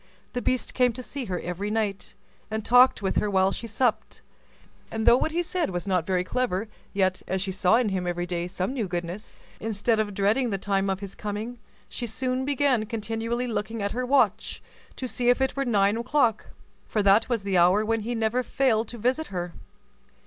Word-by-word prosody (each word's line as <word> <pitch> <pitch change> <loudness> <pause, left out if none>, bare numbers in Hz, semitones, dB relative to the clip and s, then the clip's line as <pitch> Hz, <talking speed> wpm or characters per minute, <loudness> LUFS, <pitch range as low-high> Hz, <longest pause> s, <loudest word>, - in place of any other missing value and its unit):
The 245 - -2
beast 255 0 0
came 250 -2 +3
to 255 +2 -7
see 270 +1 -5
her 180 -4 -3
every 180 +4 -4
night, 210 -2 -2 0.3
and 220 -1 -3
talked 245 -2 +5
with 190 - 0
her 210 - +1
while 190 -1 +3
she 230 - -5
supped; 220 -1 -1 0.7
and 220 0 -3
though 235 - +8
what 260 - +1
he 340 +2 -1
said 350 0 -1
was 175 -2 -3
not 185 -4 0
very 185 -1 +1
clever, 225 -1 -1 0.2
yet, 185 -2 +1
as 190 - -1
she 190 +1 -1
saw 190 +2 +3
in 235 -2 +2
him 185 -2 -2
every 175 0 -1
day 175 -1 -3
some 185 +6 -3
new 235 -7 -2
goodness, 175 +4 -5 0.2
instead 220 +1 0
of 205 -2 -1
dreading 215 +6 +2
the 200 - -1
time 195 0 0
of 190 0 -2
his 200 -1 -6
coming, 215 +4 -5 0.3
she 240 - -5
soon 255 +3 -1
began 270 -5 +1
continually 230 +2 -2
looking 225 -2 -3
at 200 - -1
her 250 +2 -2
watch, 275 +3 +1 0.3
to 255 - -4
see 245 0 0
if 245 - +4
it 265 0 0
were 275 0 -1
nine 205 -3 +3
o'clock; 235 -2 +1 0.4
for 210 - 0
that 200 +4 +4
was 230 -5 0
the 195 -2 +2
hour 185 +5 +4
when 225 +1 +1
he 235 +3 -3
never 225 +2 +1
failed 240 -4 +1
to 240 - -7
visit 255 +8 0
her. 175 -2 -4
220 Hz, 205 wpm, -26 LUFS, 195-245 Hz, 0.7 s, though